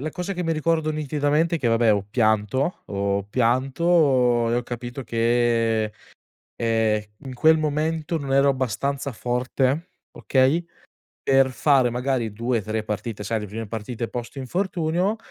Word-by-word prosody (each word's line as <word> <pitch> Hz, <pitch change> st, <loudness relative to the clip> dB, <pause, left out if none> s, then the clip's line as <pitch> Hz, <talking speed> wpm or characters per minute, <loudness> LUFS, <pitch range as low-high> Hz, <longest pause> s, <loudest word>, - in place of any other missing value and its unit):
la 155 Hz, +3 st, -3 dB
cosa 180 Hz, +4 st, -4 dB
che 180 Hz, -1 st, -3 dB
mi 165 Hz, -1 st, 0 dB
ricordo 160 Hz, 0 st, 0 dB
nitidamente 150 Hz, +2 st, 0 dB
è -, -, -6 dB
che 120 Hz, -, 0 dB
vabbè, 115 Hz, -1 st, +4 dB
ho 100 Hz, -1 st, +1 dB
pianto 110 Hz, -, +1 dB
ho 100 Hz, 0 st, -1 dB
pianto 130 Hz, +1 st, +2 dB
e -, -, +1 dB
ho 120 Hz, -, 0 dB
capito 120 Hz, +2 st, -6 dB
che, 115 Hz, -1 st, +1 dB, 0.6 s
ehm, 110 Hz, -2 st, +1 dB, 0.2 s
in 130 Hz, -, -6 dB
quel 160 Hz, +6 st, +4 dB
momento 155 Hz, +2 st, -1 dB
non 135 Hz, -2 st, -2 dB
ero 140 Hz, 0 st, +5 dB
abbastanza 135 Hz, +2 st, -2 dB
forte, 130 Hz, -, -1 dB, 0.2 s
okay, 135 Hz, +6 st, +2 dB, 0.6 s
per 135 Hz, -1 st, +3 dB
fare 130 Hz, -1 st, +3 dB
magari 125 Hz, -2 st, -1 dB
2-3 110 Hz, -1 st, -2 dB
partite. 105 Hz, 0 st, -4 dB
Sai, 110 Hz, +1 st, -1 dB
le 105 Hz, -, -5 dB
prime 110 Hz, +3 st, -6 dB
partite 115 Hz, +2 st, -5 dB
post 120 Hz, +3 st, -7 dB
infortunio 175 Hz, -, -1 dB
130 Hz, 145 wpm, -23 LUFS, 115-150 Hz, 0.6 s, ero